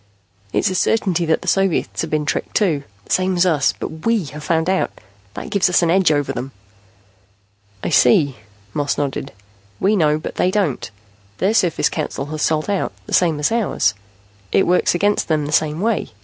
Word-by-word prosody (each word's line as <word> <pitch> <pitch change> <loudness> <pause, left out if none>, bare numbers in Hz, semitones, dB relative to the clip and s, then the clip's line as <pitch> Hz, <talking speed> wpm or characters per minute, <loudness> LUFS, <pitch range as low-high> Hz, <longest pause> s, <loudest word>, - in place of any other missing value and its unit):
"It's 190 - +1
a - - -1
certainty 180 -3 +1
that 160 - +1
the - - -9
Soviets 195 -3 +1
have 165 - -3
been 155 -1 -1
tricked, - - -3
too, 160 -9 +1 0.2
the - - -13
same 185 0 +2
as 175 - +4
us. 155 -6 +2
But 160 0 -8
we 230 -6 +1
have 150 0 -8
found 160 +1 0
out. 190 0 +1 0.5
That - - -7
gives 195 -2 +3
us 180 - +3
an 165 - +2
edge 185 -2 +4
over 145 -2 0
them." 130 +2 -6 1.3
"I - - -1
see." 130 +2 +4 0.4
Moss 145 -1 -1
nodded. 140 -1 -3 0.5
"We 205 +3 +2
know, 155 -5 +3
but 155 - -7
they 180 - +2
don't. 190 - -1 0.5
Their 195 +4 +1
Surface 180 -6 +2
Council 150 -3 -3
has 155 - -4
sold 155 0 +1
out, 200 -2 -1
the - - -8
same 165 -4 +3
as 150 - +1
ours. 230 - +1 0.6
It 195 - +3
works 180 0 +2
against 205 +4 +1
them 155 -2 0
the 145 - -4
same 155 +1 +1
way. 225 0 0
165 Hz, 190 wpm, -19 LUFS, 150-190 Hz, 1.3 s, as